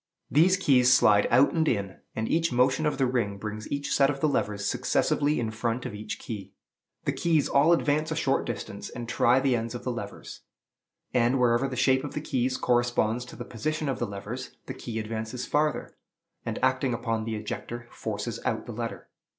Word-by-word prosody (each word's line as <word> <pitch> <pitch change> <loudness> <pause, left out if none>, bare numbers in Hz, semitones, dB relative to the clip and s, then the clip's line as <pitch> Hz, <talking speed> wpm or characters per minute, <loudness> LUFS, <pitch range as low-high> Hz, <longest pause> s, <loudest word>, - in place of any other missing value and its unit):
These 175 +6 +5
keys 130 -9 +4
slide 105 -5 +5
out 130 +4 +5
and 160 -2 +1
in, 100 -6 -1 0.2
and 110 0 -1
each 165 -1 +1
motion 130 +5 +2
of 150 - -1
the 135 - +2
ring 120 -6 0
brings 105 +1 -6
each 140 0 -1
set 135 -1 +4
of 140 -1 -2
the 155 - +2
levers 105 -7 -1
successively 145 +7 +1
in 115 -2 -1
front 115 +2 -2
of 125 - -4
each 105 +1 -5
key. 100 -3 -7 0.5
The - - +2
keys 160 -4 +1
all 145 +4 +4
advance 155 -1 +2
a 160 - -2
short 135 -4 +1
distance, 105 -3 -5
and 120 -1 -7
try 120 +2 +3
the 130 -2 +2
ends 115 0 -3
of - - -6
the - - -1
levers; - - -7 0.7
and, 125 +1 +3
wherever 120 +2 +3
the 130 - -5
shape 130 +1 +3
of 145 - -6
the - - 0
keys 130 -3 0
corresponds 120 -1 +1
to - - -11
the 120 - -7
position 155 +6 -3
of 135 -2 -1
the 120 - -1
levers, 105 +6 -7
the 130 - -5
key 120 -3 -6
advances 110 +3 -4
farther, 150 +1 0 0.5
and, - - -2
acting 125 -3 +2
upon 115 -2 -2
the 115 -1 -2
ejector, 120 +3 -6
forces 110 +1 -4
out 115 -4 -1
the 120 - -7
letter. 115 +1 -5
125 Hz, 200 wpm, -27 LUFS, 110-140 Hz, 0.7 s, These